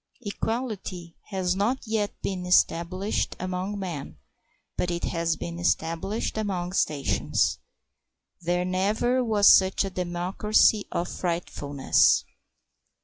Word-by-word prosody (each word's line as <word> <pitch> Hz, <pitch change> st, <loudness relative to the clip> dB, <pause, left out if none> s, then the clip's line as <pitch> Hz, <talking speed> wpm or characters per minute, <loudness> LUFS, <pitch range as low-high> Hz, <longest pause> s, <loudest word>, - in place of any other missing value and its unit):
Equality 205 Hz, -6 st, -4 dB
has 185 Hz, -3 st, -1 dB
not 215 Hz, +7 st, +1 dB
yet 215 Hz, -2 st, -2 dB
been 180 Hz, -2 st, -3 dB
established 180 Hz, +3 st, +1 dB
among 185 Hz, +2 st, -3 dB
men, 160 Hz, -, -6 dB, 0.6 s
but 180 Hz, -, -1 dB
it 170 Hz, 0 st, -3 dB
has 165 Hz, -1 st, 0 dB
been 170 Hz, 0 st, -6 dB
established 175 Hz, +6 st, -1 dB
among 185 Hz, -4 st, -2 dB
stations. 145 Hz, -7 st, 0 dB, 0.8 s
There 175 Hz, +1 st, 0 dB
never 210 Hz, +7 st, +1 dB
was 215 Hz, -3 st, +3 dB
such 190 Hz, +1 st, +6 dB
a 195 Hz, -, -5 dB
democracy 185 Hz, +4 st, +2 dB
of 175 Hz, -, -1 dB
frightfulness. 145 Hz, -6 st, +1 dB
185 Hz, 105 wpm, -26 LUFS, 175-205 Hz, 0.8 s, such